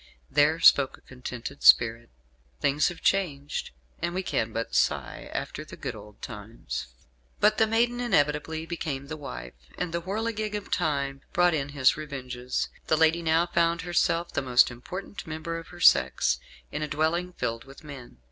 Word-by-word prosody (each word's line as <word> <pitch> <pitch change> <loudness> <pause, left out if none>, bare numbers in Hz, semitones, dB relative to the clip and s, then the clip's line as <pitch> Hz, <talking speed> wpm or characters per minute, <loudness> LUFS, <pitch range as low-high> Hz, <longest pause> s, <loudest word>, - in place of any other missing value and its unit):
There 150 +3 +4
spoke 140 -4 +6
a - - -24
contented 125 -2 -8
spirit. 115 0 +5 0.5
Things 145 +2 +2
have 175 - -5
changed, 145 -8 0 0.3
and 170 +1 -2
we 190 - -1
can 110 -9 -1
but 115 +1 -4
sigh - - 0
after - - -4
the - - -11
good - - -4
old 105 -1 -13
times. - - -6 0.5
But 215 +1 +4
the 220 - +5
maiden 235 +2 +1
inevitably 160 -7 +1
became 155 -5 -4
the 155 - -4
wife, - - -8 0.2
and 180 -2 -3
the 170 - -1
whirligig 215 +3 -2
of 205 -1 -6
Time 140 -5 0
brought 175 0 +4
in 145 -2 -1
his 140 -2 +3
revenges. 130 -4 -4 0.2
The 155 - +3
lady 160 +1 +4
now 165 +1 +3
found 170 -1 +1
herself 170 -1 0
the - - 0
most 125 -2 +4
important 180 +12 -8
member 160 +1 -4
of 165 - -11
her 175 - -12
sex, 65 - +4 0.3
in - - -3
a 150 - -1
dwelling 165 +5 0
filled 115 -7 -3
with 135 +2 -14
men. 135 - -10
155 Hz, 170 wpm, -27 LUFS, 135-175 Hz, 0.5 s, spoke